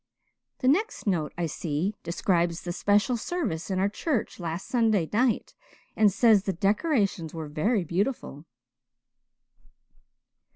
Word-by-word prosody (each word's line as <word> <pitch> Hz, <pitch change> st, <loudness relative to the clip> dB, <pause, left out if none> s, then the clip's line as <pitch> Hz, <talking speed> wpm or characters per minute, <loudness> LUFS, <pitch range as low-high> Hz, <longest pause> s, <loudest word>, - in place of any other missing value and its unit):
The 255 Hz, -, +1 dB
next 395 Hz, +12 st, +1 dB
note, 170 Hz, -7 st, 0 dB
I 175 Hz, -, 0 dB
see, 165 Hz, +4 st, -2 dB
describes 170 Hz, -1 st, 0 dB
the 175 Hz, -, -3 dB
special 205 Hz, +7 st, +2 dB
service 220 Hz, -, -3 dB
in 190 Hz, -, -1 dB
our 190 Hz, +1 st, +2 dB
church 235 Hz, +3 st, -2 dB
last 170 Hz, +1 st, -4 dB
Sunday 220 Hz, -8 st, +2 dB
night 240 Hz, +2 st, +1 dB, 0.4 s
and 215 Hz, -2 st, +4 dB
says 220 Hz, 0 st, +5 dB
the 195 Hz, -, 0 dB
decorations 200 Hz, -, 0 dB
were 160 Hz, -2 st, -5 dB
very 190 Hz, +8 st, 0 dB
beautiful." 170 Hz, -, -2 dB
195 Hz, 125 wpm, -27 LUFS, 170-225 Hz, 0.4 s, says